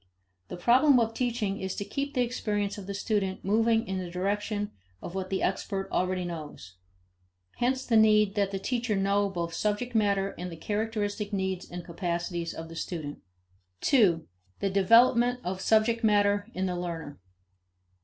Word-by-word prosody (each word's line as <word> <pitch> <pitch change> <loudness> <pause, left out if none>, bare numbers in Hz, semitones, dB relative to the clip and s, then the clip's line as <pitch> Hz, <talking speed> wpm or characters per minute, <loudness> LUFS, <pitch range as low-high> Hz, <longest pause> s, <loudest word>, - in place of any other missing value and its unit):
1 - - -7
The 175 - -16
problem 260 +2 +6
of 225 -1 0
teaching 225 -5 -1
is 190 0 -3
to 200 - -4
keep 280 +4 -4
the 250 - +3
experience 210 -4 -2
of 195 - -9
the 200 - -3
student 200 -2 -1
moving 225 +2 +3
in 190 0 -2
the 180 -1 -5
direction 205 +3 -2 0.3
of 170 - -8
what 190 -1 -3
the 190 - -1
expert 195 -2 -1
already 185 0 0
knows. 155 - -7 0.8
Hence 260 +2 0
the 230 - +3
need 215 -2 +5
that 200 -2 +1
the 195 - -3
teacher 235 +2 -1
know 200 +1 +2
both 170 -3 -3
subject 215 +6 -1
matter 200 -3 +2
and 180 0 -5
the 165 - -8
characteristic 210 +1 -2
needs 190 -2 -2
and 175 -1 -7
capacities 170 0 -3
of 165 - -7
the 165 - -10
student. 155 -4 -5 0.6
2. 190 - +3 0.3
The 195 - 0
Development 235 +5 +5
of 185 +1 -3
Subject 225 +3 +3
Matter 205 -1 +3
in 185 +1 -1
the 180 -1 -1
Learner. 170 -4 -5
200 Hz, 170 wpm, -28 LUFS, 185-225 Hz, 0.8 s, problem